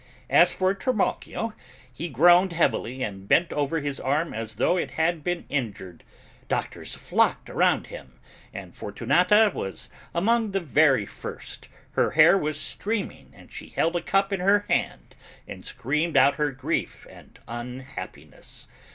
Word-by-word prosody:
As 175 +1 +6
for 185 0 +1
Trimalchio, 225 +1 -2 0.4
he 165 +8 -5
groaned 175 +6 +5
heavily 130 -6 0
and 100 -3 -6
bent 170 +9 +3
over 145 +2 0
his 140 -1 -4
arm 150 +5 -1
as 110 -1 -6
though 175 - +2
it 180 - -1
had 160 -1 +1
been 175 +1 -2
injured: 105 - -4 0.4
doctors - - -3
flocked - - 0
around - - +2
him, 65 -1 -11 0.3
and - - -9
Fortunata 180 - +3
was 95 - -5 0.2
among 220 +3 +1
the 195 - +1
very 145 - +3
first, - - -9 0.2
her - - +1
hair 165 +4 +8
was 155 -5 -1
streaming 210 -1 -4
and - - -17
she - - -9
held 165 +2 0
a 175 - 0
cup 195 +1 +1
in 195 - -1
her 200 +3 +3
hand - - -1 0.3
and - - -9
screamed 150 +6 -1
out 140 +2 +5
her 150 -1 +1
grief 130 -1 -3
and - - -16
unhappiness. 125 -3 -9
160 Hz, 150 wpm, -25 LUFS, 130-185 Hz, 0.4 s, hair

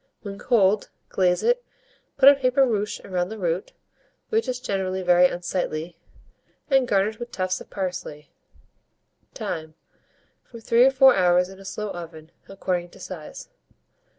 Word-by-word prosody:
When 200 -1 -7
cold, 210 -4 +2 0.2
glaze 180 -2 +1
it, - - +2 0.5
put 265 - +6
a 280 - +11
paper 270 0 +2
ruche 210 -4 -2
round 180 -1 -2
the 220 - -6
root, 175 -1 -2 0.6
which 445 0 0
is 250 -1 -2
generally 190 -4 -2
very 180 0 +5
unsightly, 175 -2 -4 0.8
and 265 -2 +4
garnish 205 +1 +1
with 240 0 -6
tufts 185 -1 -2
of - - -12
parsley. 180 -6 -5 1.0
Time. 155 -1 -5 0.7
From 230 - -12
3 235 +2 +4
or - - +7
4 265 -1 +6
hours 180 -1 +3
in 190 0 -13
a 195 - -13
slow 210 +1 -5
oven, 165 -2 -9 0.2
according 180 -2 -3
to - - -17
size. 170 -5 -9
190 Hz, 150 wpm, -24 LUFS, 175-235 Hz, 1.0 s, a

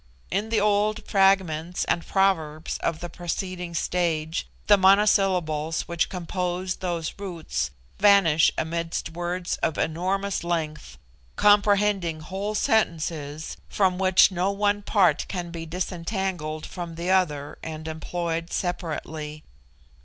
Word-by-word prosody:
In 205 +3 -1
the 225 - +2
old 210 +1 +1
fragments 185 -4 +2
and 170 - 0
proverbs 165 -6 0
of 160 - -2
the 175 - -4
preceding 175 0 -4
stage 165 -1 -1 0.2
the 205 - +7
monosyllables 190 -5 +3
which 170 -1 -1
compose 180 0 -3
those 170 -3 -3
roots 165 - -3 0.3
vanish 195 -6 +5
amidst 165 +1 -2
words 175 +1 -3
of 155 - -1
enormous 190 +4 -1
length, 155 - -3 0.4
comprehending 205 -5 +3
whole 195 +6 -4
sentences 160 -8 -1
from 185 -2 +1
which 190 0 +5
no 185 +1 0
one 205 +1 +1
part 200 -3 +2
can 175 -3 -4
be 165 -1 -6
disentangled 175 -2 -3
from 170 -2 -7
the 170 +2 -2
other 150 -7 0
and 160 0 -6
employed 165 +1 -3
separately. 155 -4 -4
175 Hz, 115 wpm, -25 LUFS, 160-195 Hz, 0.4 s, the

